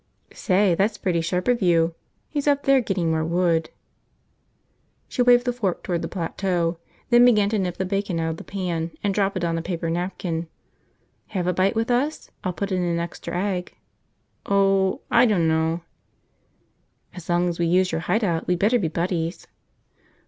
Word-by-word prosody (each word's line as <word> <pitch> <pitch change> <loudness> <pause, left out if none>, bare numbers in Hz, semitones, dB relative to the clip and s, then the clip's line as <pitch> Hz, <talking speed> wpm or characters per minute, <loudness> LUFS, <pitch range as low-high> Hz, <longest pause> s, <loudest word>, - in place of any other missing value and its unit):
"Say, 190 -1 +2
that's 205 +5 +1
pretty 175 -3 0
sharp 180 +2 -2
of 245 -2 +2
you. 170 -2 +3 0.3
He's 290 -1 -3
up 285 -1 +3
there 275 -1 +4
getting 185 -7 -1
more 160 0 0
wood." 165 -1 +1 1.4
She 255 - -2
waved 245 0 +5
the 245 - 0
fork 205 -7 -2
toward 175 -2 -2
the - - -3
plateau, 175 -1 -2 0.3
then 240 0 +7
began 210 -5 +5
to 215 -1 0
nip 180 -2 -2
the 190 - -1
bacon 195 -2 -2
out 165 0 -1
of 160 - -6
the - - -9
pan 175 -4 -3
and 200 -1 +1
drop 195 -1 0
it 180 - -3
on 165 -1 0
a - - -3
paper 165 -1 -3
napkin. 175 -1 -3 0.8
"Have 185 -4 -3
a 180 - +1
bite 185 +4 +1
with 225 +2 0
us? 275 +6 -1
I'll 185 - -1
put 200 +3 -4
in 185 -1 0
an 170 -1 0
extra 170 +1 -5
egg." 185 -2 -3 0.7
"Oh.... 195 -1 +2
I 240 0 +6
dunno." 165 -4 +1 1.3
"As 180 -2 -11
long 175 +1 +2
as 175 -1 -3
we 170 - +2
use 185 +2 +2
your 160 - -2
hide 220 +6 0
out, 170 -5 -1
we'd 180 - +2
better 220 +7 +3
be 180 - 0
buddies." 170 +1 -2
180 Hz, 185 wpm, -23 LUFS, 170-205 Hz, 1.4 s, then